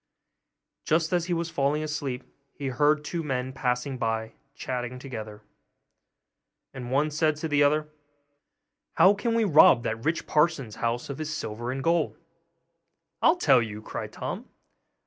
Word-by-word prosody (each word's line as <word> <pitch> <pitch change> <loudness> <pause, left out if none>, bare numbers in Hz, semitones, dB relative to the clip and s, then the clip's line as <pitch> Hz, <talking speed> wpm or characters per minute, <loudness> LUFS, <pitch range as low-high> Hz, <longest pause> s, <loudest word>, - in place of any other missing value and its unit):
Just 160 +2 +1
as 175 -1 +2
he 180 - -1
was 170 0 -3
falling 145 +2 0
asleep, 145 -4 -3 0.3
he 140 -2 -3
heard 150 +4 +2
two 170 +2 -3
men 130 -3 -3
passing 125 0 -2
by, 110 -1 -2 0.2
chatting 125 -1 -4
together; 110 -5 -8 1.3
and 125 -2 -7
one 145 +4 +1
said 155 0 +1
to 155 +2 -4
the 145 -1 +2
other, 150 +1 +3 1.1
'How 185 +4 +7
can 230 +3 -1
we 230 - +3
rob 155 - +6
that 115 +1 -3
rich 160 +4 0
parson's 150 -8 +1
house 120 +3 -2
of 140 - -7
his 155 0 -3
silver 120 -5 -4
and 135 0 -4
gold?' 170 +1 +1 1.0
'I'll 325 - +5
tell 130 - +5
you!' 110 -1 -6
cried - - -6
Tom. - - -6
140 Hz, 150 wpm, -27 LUFS, 125-155 Hz, 1.3 s, How